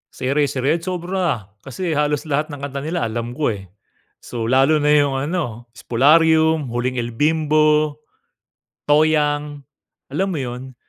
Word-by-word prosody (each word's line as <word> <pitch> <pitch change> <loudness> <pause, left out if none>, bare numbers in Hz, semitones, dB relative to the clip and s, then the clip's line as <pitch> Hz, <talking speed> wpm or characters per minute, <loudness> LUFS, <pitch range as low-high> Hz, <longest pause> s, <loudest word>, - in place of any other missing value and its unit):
Sa 130 - -5
Eraserheads 145 +5 0
sobra, 175 - -2 0.2
kasi 165 +5 -4
halos 150 0 0
lahat 150 +1 -1
ng 145 - -7
kanta 140 0 -5
nila 160 -5 -2
alam 115 +1 -4
ko, 125 -3 -1
eh. 95 -2 -11 0.5
So, 115 -1 -5
lalo 135 +4 +3
na 150 - +3
yung 145 -2 +3
ano, 135 -5 -3
"Spolarium", 160 +6 +3
"Huling 125 +1 -2
El 120 -1 -3
Bimbo", 155 +1 +2 0.9
"Toyang", 150 -1 +2 0.5
alam 185 +8 -1
mo 175 -5 -3
yun? 125 +1 -7
145 Hz, 140 wpm, -20 LUFS, 130-155 Hz, 0.9 s, lalo